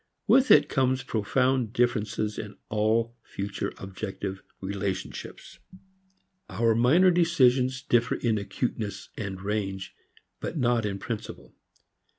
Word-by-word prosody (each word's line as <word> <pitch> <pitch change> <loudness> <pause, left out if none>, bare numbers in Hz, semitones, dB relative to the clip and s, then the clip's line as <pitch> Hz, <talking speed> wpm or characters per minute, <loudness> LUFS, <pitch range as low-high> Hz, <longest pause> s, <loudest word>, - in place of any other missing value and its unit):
With 265 0 +5
it - - +7
comes 130 -1 +1
profound 125 +1 0
differences 110 -3 0
in 105 -1 -7
all 110 +2 +1
future 100 -2 -4
objective 95 0 -5 0.2
relationships. 95 -1 -5 0.9
Our 115 -1 +2
minor 150 +12 +5
decisions 130 -7 +3
differ 120 -3 +2
in 110 -3 0
acuteness 100 -2 -4
and 100 -3 -5
range, 95 -1 -3 0.5
but - - -4
not 120 -4 +2
in 100 -1 -3
principle. 110 +1 -6
110 Hz, 110 wpm, -27 LUFS, 100-125 Hz, 0.9 s, it